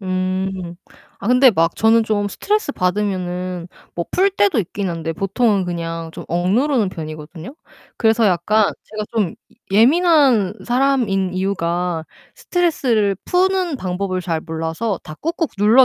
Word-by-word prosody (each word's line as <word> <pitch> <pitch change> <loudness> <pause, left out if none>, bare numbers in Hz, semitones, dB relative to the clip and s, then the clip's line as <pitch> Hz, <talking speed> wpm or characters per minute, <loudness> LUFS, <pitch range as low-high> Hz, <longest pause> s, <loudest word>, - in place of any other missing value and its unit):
음. 185 -1 -2 0.4
아 200 - -4
근데 250 +1 +6
막 165 -4 +1
저는 225 +1 +4
좀 210 -2 0
스트레스 415 - -1
받으면은 180 -3 -2 0.3
뭐 170 - -2
풀 390 +2 +3
때도 390 - +2
있기는 195 -1 -2
한데 165 -1 -4
보통은 195 +3 +1
그냥 165 -1 -4
좀 - - -9
억누르는 210 - +1
편이거든요. 160 - -8 0.4
그래서 225 0 +3
약간 200 +4 +2
제가 215 0 -5
좀 205 -7 0 0.4
예 200 - +4
예민한 280 - +4
사람인 240 -8 +1
이유가 180 -3 -1 0.3
스트레스를 250 - +1
푸는 365 -3 +1
방법을 185 -2 -2
잘 170 -2 -2
몰라서 165 +6 -3
다 155 - -9
꾹꾹 330 +1 -1
눌러 220 +6 +6
195 Hz, 290 characters per minute, -19 LUFS, 180-245 Hz, 0.4 s, 근데